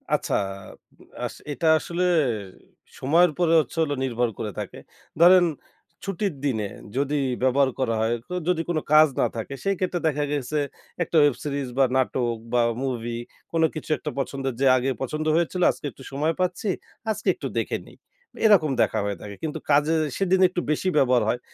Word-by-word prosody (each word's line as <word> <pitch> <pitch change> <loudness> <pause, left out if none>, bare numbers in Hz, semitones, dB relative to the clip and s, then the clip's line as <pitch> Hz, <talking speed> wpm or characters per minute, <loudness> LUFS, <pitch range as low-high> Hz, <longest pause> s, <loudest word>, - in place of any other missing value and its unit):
আচ্ছা - - -3 0.9
আস - - -5 0.2
এটা 160 +3 -1
আসলে 175 +3 -3 1.0
সময়ের 165 +6 +4
পরে 170 -2 +3
হচ্ছে 155 +1 -3
হল 150 - -2
নির্ভর 120 -2 0
করে 105 - -3
থাকে। - - -6 0.4
ধরেন 180 +1 +8 0.6
ছুটির 195 -1 -2
দিনে 110 -7 0 0.3
যদি 140 +2 0 0.3
ব্যবহার 130 +1 +3
করা 115 -4 +1
হয়, 115 +1 +1
তো - - -5
যদি 180 -2 +2
কোন 165 - 0 0.2
কাজ 155 +1 +8
না - - +4
থাকে, 115 +5 -5
সেই 195 0 +1
ক্ষেত্রে 180 -1 -1
দেখা 150 -1 0
গেছে 145 +1 -2 0.5
একটা 170 - -6
ওয়েব 145 -4 +4
সিরিজ 140 -2 -2
বা 135 - +5
নাটক 120 -2 0 0.2
বা 120 - +4 0.2
মুভি 120 -3 -3 0.3
কোন 165 -1 +1
কিছু 155 - -7
একটা 150 - -5
পছন্দের 135 -1 -2
যে - - +3
আগে 130 +2 0
পছন্দ 155 +4 -3
হয়েছিল 170 +2 0
আজকে - - -11
একটু 135 - -15
সময় 150 +4 0
পাচ্ছি। 180 +3 -1 0.4
আজকে 215 - -5
একটু - - -5
দেখে - - -1
নেই। - - -16 0.5
এরকম 190 -9 +5
দেখা 110 - +1
হয়ে 100 -1 -2
থাকে। 100 -1 -8
কিন্তু 160 0 -3
কাজে 150 +3 +4 0.2
সেদিন 190 -1 +2
একটু 180 -1 -2
বেশি 155 +5 -1
ব্যবহার 125 -4 +4
হয়। 120 +2 0
145 Hz, 175 wpm, -24 LUFS, 130-170 Hz, 1.0 s, ধরেন